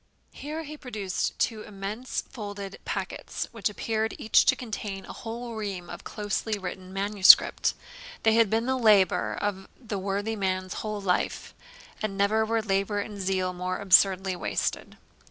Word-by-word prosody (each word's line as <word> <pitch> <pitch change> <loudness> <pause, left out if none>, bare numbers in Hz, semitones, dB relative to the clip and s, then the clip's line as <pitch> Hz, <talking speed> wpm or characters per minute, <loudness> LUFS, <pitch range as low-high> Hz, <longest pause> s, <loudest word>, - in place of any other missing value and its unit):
Here 310 +3 -6
he 305 0 -8
produced 215 -9 -3
two 220 -2 0
immense 210 +4 -4
folded 205 -5 -7
packets, - - -4
which 225 -3 -1
appeared 220 +1 -2
each 220 - +4
to - - +5
contain 210 -5 -5
a - - -8
whole 235 0 -6
ream 200 -5 -5
of - - -8
closely 210 +1 -2
written 185 -1 -7
manuscript. 195 0 +6 0.5
They 220 - +5
had 225 -2 +4
been 225 +2 +1
the 260 0 0
labour 210 -5 +4
of 195 -2 -3
the 215 -5 -4
worthy 200 +3 -2
man's 185 -2 -1
whole 215 -1 -4
life; 180 -2 -1 0.5
and 205 -2 -2
never 210 +2 +3
were 225 0 0
labour 200 0 0
and 205 0 -5
zeal 185 -1 0
more 185 +1 -3
absurdly 190 -1 +4
wasted. - - -3
205 Hz, 155 wpm, -27 LUFS, 195-220 Hz, 0.5 s, manuscript